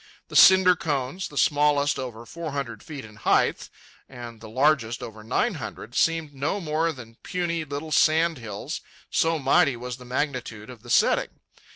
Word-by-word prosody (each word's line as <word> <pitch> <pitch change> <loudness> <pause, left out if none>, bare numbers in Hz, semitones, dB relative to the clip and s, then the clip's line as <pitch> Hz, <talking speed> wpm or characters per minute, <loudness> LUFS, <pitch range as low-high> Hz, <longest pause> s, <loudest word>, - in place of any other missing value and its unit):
The - - -9
cinder 190 -1 +7
cones, 145 +2 -3
the 145 - -11
smallest 145 -1 +2
over 120 -3 -6
four 165 +3 -6
hundred 120 -6 -4
feet 145 -6 -8
in 105 -1 -14
height - - +1 0.4
and 120 -3 -10
the 110 - -10
largest 130 -2 +1
over 110 -1 -9
nine 165 - 0
hundred, 120 - -8
seemed 165 0 +1
no 145 +9 -2
more 165 -1 0
than 120 -5 -12
puny 170 -2 -2
little 150 +2 -6
sand 160 0 +3
hills, 105 -4 -6 0.3
so 165 0 +2
mighty 140 -1 +3
was 125 0 -6
the 125 - -13
magnitude 125 -4 -3
of 120 -3 -13
the 120 - -14
setting. 115 - +3
140 Hz, 170 wpm, -25 LUFS, 120-160 Hz, 0.4 s, cinder